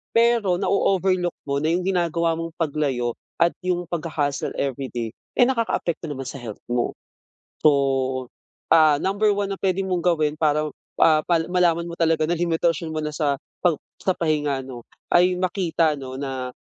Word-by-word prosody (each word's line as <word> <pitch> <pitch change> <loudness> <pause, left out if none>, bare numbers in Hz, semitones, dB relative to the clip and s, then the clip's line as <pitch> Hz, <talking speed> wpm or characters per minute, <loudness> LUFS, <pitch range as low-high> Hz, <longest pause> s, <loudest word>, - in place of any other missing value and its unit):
Pero 230 -5 +4
na-o-overlook 185 -2 +1
mo 140 0 -1
na 155 - 0
yung 175 +2 +1
ginagawa 170 -3 +1
mong 165 0 -5
paglayo 145 -7 -1 0.3
at 170 0 +4
yung 180 -1 -1
pagha-hustle 155 -4 -2
everyday, 130 -4 -3 0.2
eh, 250 - +5
nakakaapekto 230 -9 -1
naman 135 -2 -5
sa 135 +2 -6
health 115 -4 -8
mo. 120 0 0 0.7
So, 155 - +6 1.0
ah, 155 -3 +5
number 205 +2 +2
1 200 0 -2
na 195 - -3
puwede 190 0 +1
mong 185 -2 -1
gawin 155 -4 +2
paraw, 150 -1 +2 0.3
ah, 155 -1 +6
pa 170 -2 +3
malaman 175 -2 +2
mo 170 - -6
talaga 165 -1 +2
na 170 - +1
limitasyon 165 -1 0
mo - - -1
na 150 - -3
sa 145 -3 +1 0.3
pap 175 -4 +3 0.3
sa 185 - +2
pahinga, 150 -4 0
'no? 125 -2 -8 0.3
Ay 180 +1 +5
makita, 175 -4 +1
'no, 130 -1 -7
na 130 -2 -4
165 Hz, 160 wpm, -23 LUFS, 145-180 Hz, 1.0 s, So